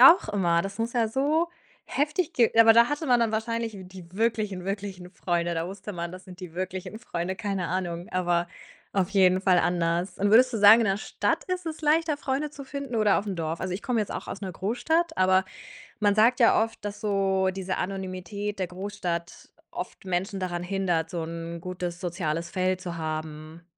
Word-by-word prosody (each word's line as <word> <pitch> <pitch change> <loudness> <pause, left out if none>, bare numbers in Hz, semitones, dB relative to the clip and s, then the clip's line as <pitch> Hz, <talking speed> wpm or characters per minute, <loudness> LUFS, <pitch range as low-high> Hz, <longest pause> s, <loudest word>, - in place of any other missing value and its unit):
auch 325 +8 +8
immer. 175 -4 +2
Das 195 +2 -6
muss 230 +1 -1
ja 235 -2 +2
so 295 +8 +1 0.4
heftig 300 +4 -1
ge 235 -3 +3
aber 225 0 +9
da 235 +1 +6
hatte 295 +2 -2
man 245 -2 +4
dann 230 -2 +1
wahrscheinlich, 225 0 -2
die 185 -2 -11
wirklichen, 210 -3 -1
wirklichen 195 -2 -5
Freunde. 175 -2 -1
Da 165 0 -2
wusste 200 +2 -7
man, 170 -1 -5
das 185 0 -10
sind 185 0 -12
die 175 -3 -9
wirklichen 185 +3 -4
Freunde, 185 -5 -4
keine 195 -5 -2
Ahnung, 175 -1 -3
aber 175 -1 +1 0.5
auf 190 -1 +1
jeden 190 -2 +4
Fall 185 -2 +4
anders. 175 +1 0
Und 200 +1 +2
würdest 250 +4 +6
du - - -1
sagen, 210 +3 +9
in 230 - +2
der 195 -1 +2
Stadt 210 - -1
ist 365 -1 -3
es 320 -1 -4
leichter, 310 0 +2
Freunde 285 +1 -2
zu 285 -1 -9
finden 275 -3 -5
oder 215 -2 +4
auf 210 - -5
'm 200 - -2
Dorf? 165 0 -3
Also, 185 -1 -2
ich 195 - -5
komme 245 -3 0
jetzt 210 - -3
auch - - -5
aus - - -6
'ner 190 -3 -5
Großstadt, 320 - 0
aber 185 0 +4 0.6
man 205 -1 +3
sagt 230 +4 +4
ja 230 - +5
oft, 225 - -8
dass 205 0 -5
so 195 -2 +1
diese 190 -1 -3
Anonymität 195 +2 -4
der 185 - 0
Großstadt 180 -2 -5 0.2
oft 180 +2 -7
Menschen 190 +2 -2
daran 175 -2 -3
hindert, 180 -4 0
so 170 -2 -3
'n 165 +1 -6
gutes 180 0 -5
soziales 170 -2 -2
Feld 185 0 0
zu 175 -2 -5
haben. 155 +1 -5
190 Hz, 200 wpm, -27 LUFS, 175-225 Hz, 0.6 s, aber